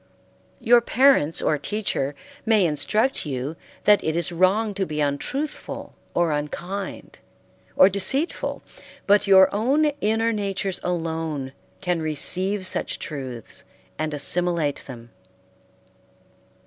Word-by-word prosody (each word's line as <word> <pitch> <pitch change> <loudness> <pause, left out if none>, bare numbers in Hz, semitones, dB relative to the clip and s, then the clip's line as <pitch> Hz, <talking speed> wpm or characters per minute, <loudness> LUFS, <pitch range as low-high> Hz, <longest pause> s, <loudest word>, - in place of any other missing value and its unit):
Your 240 -1 +5
parents 235 - +3
or 150 -1 +1
teacher 170 -10 -2 0.3
may 220 -4 +3
instruct 190 - +1
you 140 +1 -4 0.3
that 210 0 +4
it 160 0 -1
is 170 0 0
wrong 195 +5 +2
to 195 -1 -2
be 150 0 -4
untruthful 150 - -3 0.2
or 170 -2 +2
unkind 175 +7 -5 0.6
or 185 - +7
deceitful, 200 - -1 0.4
but 205 0 +3
your 190 -1 +6
own 265 +9 +2 0.2
inner 225 +2 +1
natures 195 -2 -2
alone 160 -5 -3 0.3
can 180 -2 -1
receive 185 +6 -1
such - - -3
truths 130 - -7 0.4
and 155 0 -2
assimilate 165 0 +1
them. 120 -3 -11
180 Hz, 110 wpm, -23 LUFS, 150-210 Hz, 0.6 s, or